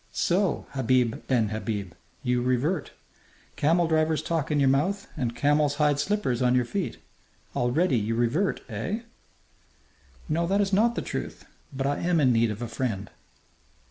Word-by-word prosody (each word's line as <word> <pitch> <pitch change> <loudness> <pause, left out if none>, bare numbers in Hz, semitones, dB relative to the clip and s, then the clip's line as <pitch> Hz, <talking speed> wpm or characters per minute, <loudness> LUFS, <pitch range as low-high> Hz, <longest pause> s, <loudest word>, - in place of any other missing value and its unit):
"So, 185 -1 +1
Habib 125 -3 +1
ben 115 -5 +2
Habib, 105 -4 -4 0.3
you 125 0 +1
revert! 135 +7 0 0.7
Camel 165 +3 +2
driver's 160 -1 +1
talk 165 -4 -1
in 150 -1 +1
your 140 - +4
mouth 160 +10 +1
and 120 -2 -2
camel's 145 +1 +2
hide 145 -1 +2
slippers 145 - 0
on 125 0 +3
your 125 -1 +2
feet. 195 +7 -3 0.6
Already 125 +3 +2
you 110 +2 -1
revert! 120 - +1
Eh?" 135 - -3 1.3
"No, 170 +2 0
that 195 +3 +2
is 200 -1 +1
not 230 +4 +3
the - - -2
truth. - - -5 0.3
But 135 -1 -3
I 145 +1 0
am 175 -1 +1
in 130 -4 +4
need 115 0 +3
of 105 +3 -4
a - - -3
friend." 115 -4 -3
140 Hz, 160 wpm, -26 LUFS, 120-170 Hz, 1.3 s, your